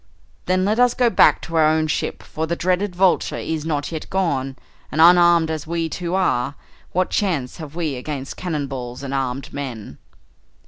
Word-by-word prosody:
"Then 185 0 +2
let 215 +3 +1
us 245 -1 +4
go 245 -2 +3
back - - +4
to 165 - -6
our 155 -1 +5
own 155 0 +2
ship, 155 - -2
for 160 +1 -4
the 170 - -1
dreaded 180 +2 0
Vulture 185 0 +2
is 160 -1 -3
not 150 -1 -2
yet 160 -2 -6
gone, 140 -8 -1 0.4
and 155 - -3
unarmed 170 -1 +6
as 155 -1 -4
we 165 0 -1
too 175 +3 -3
are, 140 -8 +1 0.4
what 185 +1 0
chance 160 -11 -1
have 155 -3 -9
we 165 -4 -2
against 135 +1 -5
cannon 155 -6 -3
balls 125 -1 -6
and 135 0 -4
armed 135 0 -3
men?" 120 - -6
160 Hz, 185 wpm, -21 LUFS, 140-180 Hz, 0.4 s, unarmed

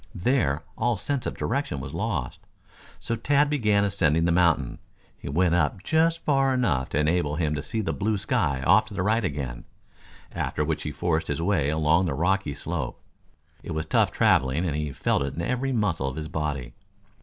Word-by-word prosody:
There, 90 - +1 0.2
all 120 -1 +1
sense 130 +7 -2
of - - -5
direction 145 +1 -2
was - - -7
lost. 90 - -3 0.6
So 115 - -2
Tad, 145 +5 +2
began 105 -8 +2
ascending 85 -5 +2
the 85 - +2
mountain. 85 -7 +2 0.4
He - - -8
went 85 +4 +2
up 90 +2 +1
just 165 +4 +1
far 135 -2 +3
enough 85 - 0
to - - -2
enable 75 -1 +1
him 80 -2 0
to 75 - -2
see 75 +10 -3
the 80 -6 -2
blue 105 +9 0
sky 70 -7 0
off 110 +10 +5
to 100 - -9
the 90 - -1
right 110 +3 +2
again, 70 -8 -4 0.7
after 75 - -2
which 80 0 -2
he 75 - -4
forced 80 +2 -1
his 75 - -2
way 85 -5 +1
along 80 +4 +2
the 70 - -1
rocky 90 -1 0
slope. - - -4 0.6
It - - -6
was 80 0 -2
tough - - +2
traveling 65 +7 +2
and 75 -4 -1
he 75 -1 -2
felt - - 0
it 70 0 -3
in 85 - -3
every 125 +7 -1
muscle 105 - 0
of 65 - -4
his 80 0 -5
body. 70 -6 -3
85 Hz, 195 wpm, -26 LUFS, 75-110 Hz, 0.7 s, off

